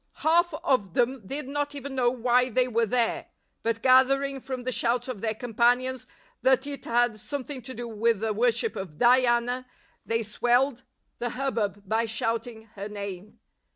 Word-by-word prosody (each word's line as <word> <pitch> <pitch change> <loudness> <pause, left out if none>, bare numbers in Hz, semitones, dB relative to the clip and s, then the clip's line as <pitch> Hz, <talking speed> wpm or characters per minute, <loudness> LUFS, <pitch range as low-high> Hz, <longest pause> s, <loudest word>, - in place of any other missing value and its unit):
Half 340 +1 +4
of 205 -10 +1
them 245 -3 0
did 280 +3 -4
not 290 +1 -2
even 280 0 -6
know 250 -2 +2
why 250 +1 +2
they 250 +2 +2
were 230 -1 +1
there; 235 +1 0 0.3
but 230 0 -2
gathering 270 +1 +4
from 255 -1 -5
the 255 - -2
shouts 245 0 0
of 245 -6 -5
their 220 -1 -1
companions 245 +2 +1 0.3
that 260 +2 +3
it 285 -2 -6
had 240 -2 +1
something 280 +2 -5
to 255 +1 -8
do 240 0 -5
with 225 -1 +1
the 220 -1 0
worship 240 - +1
of 175 -6 -7
Diana, 245 0 +3 0.4
they 230 0 -1
swelled 245 +4 +1 0.3
the 240 0 -1
hubbub 220 -7 -1
by 225 +3 +1
shouting 225 0 -2
her 200 +1 -6
name. 200 -1 -7
245 Hz, 165 wpm, -27 LUFS, 225-260 Hz, 0.4 s, Half